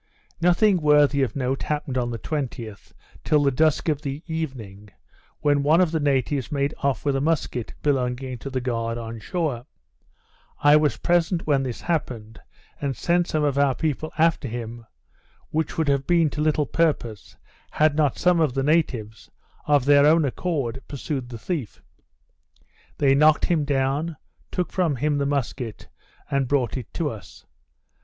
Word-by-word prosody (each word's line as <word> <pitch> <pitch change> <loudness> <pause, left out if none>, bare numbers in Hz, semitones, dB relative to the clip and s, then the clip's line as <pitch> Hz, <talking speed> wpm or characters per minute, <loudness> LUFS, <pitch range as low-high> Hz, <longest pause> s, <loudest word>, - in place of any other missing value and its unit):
Nothing 180 +3 +4
worthy 145 -2 +4
of 125 -5 -1
note 135 0 -1
happened 150 -3 -3
on 125 -2 0
the 115 - -4
20th, 120 -8 -5 0.3
till 150 -1 +3
the 140 - +3
dusk 155 +5 +1
of 150 -2 0
the 140 +1 -5
evening, 125 - -6 0.5
when 145 -1 +3
one 155 +4 +4
of 180 -3 +3
the 160 - 0
natives 140 -1 0
made 140 0 0
off 140 -2 -1
with 140 -1 +1
a 135 - 0
musquet 145 -6 -1
belonging 130 -2 -1
to 135 - -6
the 130 -1 -2
guard 115 -2 -2
on 115 -1 -6
shore. 145 - -3 0.9
I 145 0 +5
was 150 -1 +2
present 175 0 +1
when 145 -3 +2
this 130 -3 -4
happened, 115 -10 -3 0.4
and 140 -2 -2
sent 175 0 +1
some 155 -1 0
of 140 -1 +1
our 140 -2 +3
people 155 0 -2
after 165 -3 +2
him, 115 -1 -7 0.6
which 160 +2 -2
would 160 -2 +1
have 140 -1 +1
been 170 -4 +3
to 150 - -3
little 150 -1 +2
purpose, 120 - -1 0.3
had 155 -1 +2
not 150 -4 +1
some 180 -1 +3
of 150 -6 +1
the 135 - 0
natives, 130 -8 0 0.4
of 145 -3 +3
their 145 0 +6
own 160 0 +4
accord, 135 -4 -2
pursued 135 -2 -4
the 120 - -7
thief. 140 - -4 1.2
They 140 -2 +4
knocked 150 +2 +4
him 160 -4 +1
down, 140 +3 -1 0.3
took 180 - -2
from 175 -6 +1
him 145 +3 0
the 140 - 0
musquet, 130 -5 -3 0.4
and 140 -2 +1
brought 130 -4 0
it 130 -5 -7
to 155 -4 -1
us. 105 -3 -12
140 Hz, 165 wpm, -24 LUFS, 125-155 Hz, 1.2 s, their